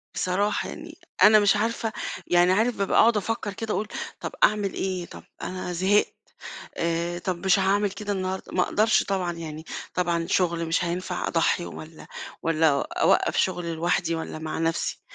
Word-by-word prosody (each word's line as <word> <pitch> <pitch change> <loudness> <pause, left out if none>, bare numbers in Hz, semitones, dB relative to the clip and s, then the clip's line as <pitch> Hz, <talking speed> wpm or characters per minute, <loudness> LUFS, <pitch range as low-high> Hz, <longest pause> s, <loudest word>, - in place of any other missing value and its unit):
بصراحة 200 +3 0
يعني - - -9 0.3
أنا 215 0 +8
مش 205 0 +4
عارفة، 225 +1 -1 0.3
يعني 175 +1 +4
عارف 220 +5 +2
بابقى 195 - +2
أقعد 225 -1 +5
أفكّر 210 0 -2
كده 225 +2 -4
اقول 210 - -1 0.3
طب - - -5
أعمل 205 -2 +3
إيه؟ 185 -2 -2
طب - - -12 0.2
أنا 185 -1 -4
زهقت، 190 +4 +2 0.6
آآ، 170 +1 -1
طب 180 +1 -4
مش 190 +1 +4
هاعمل 200 +1 +2
كده 205 0 -4
النهارده، 190 0 -4
ما 185 - +2
أقدرش 215 +4 +2
طبعًا 185 -3 -1
يعني، 160 -1 -7 0.3
طبعًا 170 -2 0
شغل 170 -3 +1
مش 165 +2 0
هينفع 180 +1 -3
أضحّي 170 +1 +1
والّا 155 0 -10 0.4
والّا 165 -1 +3 0.3
أوقّف - - +3
شغل 170 -1 0
لوحدي 170 +1 0
والّا 160 -1 -5
مع 155 0 -4
نَفسي، 165 0 -1
185 Hz, 160 wpm, -25 LUFS, 170-205 Hz, 0.6 s, أنا